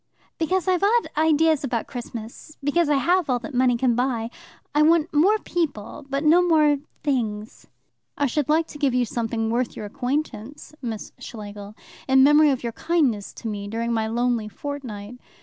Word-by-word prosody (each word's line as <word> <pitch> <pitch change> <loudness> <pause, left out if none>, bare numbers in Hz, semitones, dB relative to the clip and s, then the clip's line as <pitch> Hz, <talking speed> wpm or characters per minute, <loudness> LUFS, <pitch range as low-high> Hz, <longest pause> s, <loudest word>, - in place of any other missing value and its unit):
"Because 365 +3 0
I've 365 -2 +2
odd 455 +4 +2
ideas 315 -1 +3
about 240 -4 -2
Christmas. 240 +4 -8
Because 295 +3 +2
I 295 - +4
have 350 +3 +2
all 250 - +2
that 270 +4 -8
money 250 -1 +3
can 245 0 +2
buy. 240 -2 -1 0.4
I 295 - +3
want 320 +1 +3
more 370 +9 +4
people, 295 - -4
but 275 +2 -1
no 325 +3 +6
more 310 -4 +4 0.3
things." 220 -7 -2 0.5
"I 290 - +1
should 285 +2 -1
like 320 +2 +3
to 295 - -10
give 275 -4 +1
you 250 -1 +2
something 225 -1 -2
worth 240 +1 -1
your 210 - -6
acquaintance, 255 +3 -4
Miss 225 -4 -5
Schlegel, 205 -2 -9 0.3
in 265 0 +5
memory 295 +2 +6
of 265 -3 -1
your 235 - -2
kindness 255 - 0
to - - -7
me 205 -2 -4
during 230 +2 -2
my 220 -1 0
lonely 235 -1 0
fortnight. 245 -4 -7
265 Hz, 175 wpm, -23 LUFS, 230-305 Hz, 0.5 s, no